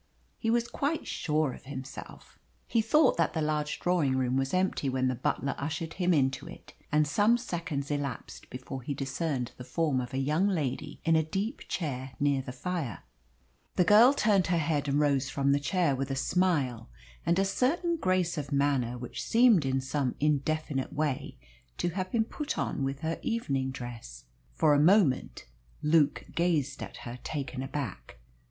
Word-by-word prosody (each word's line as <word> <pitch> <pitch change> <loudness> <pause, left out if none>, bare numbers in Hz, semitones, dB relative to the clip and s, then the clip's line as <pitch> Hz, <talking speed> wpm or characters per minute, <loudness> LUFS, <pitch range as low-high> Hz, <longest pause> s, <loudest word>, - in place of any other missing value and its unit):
He 225 - -1
was 235 +1 +2
quite 295 +6 -2
sure 150 -4 0
of - - -13
himself. 135 -1 -9 0.3
He 230 - +2
thought 300 +8 +4
that 165 -2 +1
the 160 - 0
large 150 -1 -1
drawing 160 -7 +1
room 130 -1 +1
was 135 0 0
empty 185 -6 +1
when 130 0 +1
the - - 0
butler 135 +2 -1
ushered 160 +3 -3
him 180 -1 +1
into 135 -5 +1
it, - - -12 0.2
and 150 0 +3
some 210 +10 +3
seconds 170 - -4
elapsed 140 -4 -4
before 130 +1 -7
he 140 +3 -4
discerned 135 -1 -2
the 125 - -8
form 145 -1 0
of 125 - -6
a 130 - -3
young 150 +8 +2
lady 150 -5 -2
in 165 0 +4
a 160 - +5
deep 195 - -3
chair 135 -7 -3
near 140 -1 +2
the 130 - -7
fire. 140 - -4 0.7
The 180 - +4
girl 215 +7 +7
turned 205 -7 +3
her 175 0 +2
head 150 -2 0
and 140 +1 +2
rose 140 -2 +2
from 140 0 +1
the 140 - +3
chair 145 0 +1
with 135 +1 -3
a 135 - -1
smile 135 -7 0 0.3
and 170 +2 +2
a 195 - +3
certain 315 - +1
grace 185 - 0
of 145 0 -6
manner 140 -4 +1
which 125 0 -6
seemed 225 - +5
in 135 0 +1
some 130 -1 -1
indefinite 150 -1 0
way 145 -2 -2 0.4
to 175 - 0
have 185 +2 -3
been 225 -2 +2
put 295 +5 -4
on - - -1
with 135 +1 -3
her 160 0 -2
evening 140 - -1
dress. 120 - -8 0.3
For 155 -2 +4
a 145 - +4
moment 165 -4 +3 0.4
Luke 150 -1 +3
gazed 155 -6 0
at - - -7
her, 120 +1 -7
taken 135 -3 -4
aback. 135 - -5
150 Hz, 180 wpm, -29 LUFS, 135-180 Hz, 0.7 s, girl